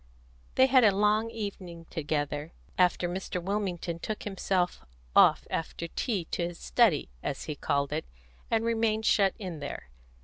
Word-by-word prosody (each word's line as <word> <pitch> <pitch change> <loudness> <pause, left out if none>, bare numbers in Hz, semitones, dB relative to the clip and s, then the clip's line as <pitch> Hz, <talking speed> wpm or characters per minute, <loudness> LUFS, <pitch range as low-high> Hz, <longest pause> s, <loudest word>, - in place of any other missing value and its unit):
They 260 - +7
had 260 -1 +5
a 205 -3 +5
long 210 +2 +3
evening 195 -7 -6
together, 145 0 -2 0.2
after 180 -1 +3
Mr. 180 +1 -3
Wilmington 180 -3 -2
took 215 +4 -4
himself 185 - -1 0.3
off - - +6
after 165 +1 -3
tea 200 -4 -2
to 170 - 0
his 175 -1 -8
study, 200 - +2
as 135 - -3
he 155 - -4
called 140 0 0
it, 155 - -2 0.4
and 225 0 +1
remained 225 -1 +1
shut 195 -3 +4
in 185 -8 -6
there. 140 - -7
185 Hz, 150 wpm, -29 LUFS, 165-215 Hz, 0.4 s, They